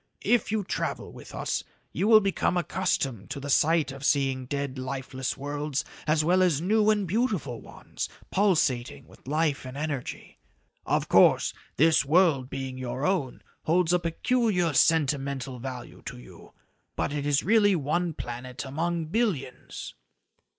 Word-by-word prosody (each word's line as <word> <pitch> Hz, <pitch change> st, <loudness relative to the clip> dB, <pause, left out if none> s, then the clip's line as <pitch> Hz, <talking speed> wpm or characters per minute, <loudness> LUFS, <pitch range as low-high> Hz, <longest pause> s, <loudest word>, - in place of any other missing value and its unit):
If 240 Hz, -4 st, +2 dB
you 215 Hz, -2 st, 0 dB
travel 190 Hz, -, -3 dB
with -, -, -11 dB
us, -, -, -2 dB, 0.3 s
you 200 Hz, -, 0 dB
will 220 Hz, -1 st, +8 dB
become 195 Hz, -2 st, 0 dB
accustomed 155 Hz, -, -1 dB
to 140 Hz, +1 st, -4 dB
the 140 Hz, +1 st, -4 dB
sight 160 Hz, 0 st, +3 dB
of 135 Hz, +1 st, -9 dB
seeing 135 Hz, -3 st, +1 dB
dead, 140 Hz, -1 st, -3 dB
lifeless 130 Hz, 0 st, -4 dB
worlds 145 Hz, 0 st, -3 dB, 0.2 s
as 155 Hz, 0 st, +2 dB
well 180 Hz, +3 st, +4 dB
as 175 Hz, -6 st, +3 dB
new 210 Hz, +5 st, +2 dB
and 210 Hz, -3 st, +2 dB
beautiful 195 Hz, -, -1 dB
ones -, -, -7 dB, 0.2 s
pulsating 150 Hz, -11 st, +1 dB
with -, -, -19 dB
life 150 Hz, 0 st, 0 dB
and 130 Hz, +1 st, -8 dB
energy. 145 Hz, -4 st, -5 dB, 0.5 s
Of -, -, +1 dB
course, -, -, +5 dB, 0.2 s
this 160 Hz, +1 st, +5 dB
world 150 Hz, -4 st, +3 dB
being 135 Hz, -1 st, -5 dB
your 130 Hz, +2 st, -3 dB
own, 170 Hz, -10 st, -1 dB, 0.2 s
holds 175 Hz, +1 st, +2 dB
a 180 Hz, -, +4 dB
peculiar 180 Hz, 0 st, +1 dB
sentimental 140 Hz, -4 st, +1 dB
value 125 Hz, 0 st, -7 dB
to -, -, -6 dB
you, -, -, -14 dB, 0.4 s
but -, -, -1 dB
it 145 Hz, -1 st, -2 dB
is 145 Hz, -1 st, +2 dB
really 205 Hz, -1 st, +4 dB
one 165 Hz, +2 st, -1 dB
planet 125 Hz, +2 st, -6 dB
among 165 Hz, +4 st, -2 dB
billions." 160 Hz, -, -3 dB
150 Hz, 150 wpm, -27 LUFS, 135-180 Hz, 0.5 s, will